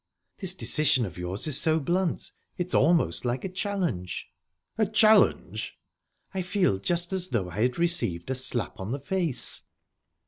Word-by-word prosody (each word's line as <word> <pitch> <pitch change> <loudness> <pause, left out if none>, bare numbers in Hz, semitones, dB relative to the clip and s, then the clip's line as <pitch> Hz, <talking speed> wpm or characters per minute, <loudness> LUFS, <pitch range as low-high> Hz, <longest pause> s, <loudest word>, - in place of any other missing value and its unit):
"This 190 -2 +1
decision 150 -8 +3
of 95 - -8
yours 90 +3 -3
is 150 -2 +4
so 160 0 +2
blunt. 175 +3 -1 0.3
It's 180 0 -3
almost 165 +4 +3
like 125 +4 -2
a - - -2
challenge." 185 - -3 0.5
"A 220 -2 +1
challenge?" 215 +1 +3 0.6
"I 190 - -1
feel 180 - +1
just 175 - -1
as 185 -1 0
though 100 - -2
I 100 +5 -3
had 125 +1 +1
received 170 - 0
a - - +2
slap 125 -3 -2
on 95 +5 -4
the 140 - -3
face." 160 -3 0
160 Hz, 160 wpm, -27 LUFS, 120-185 Hz, 0.6 s, is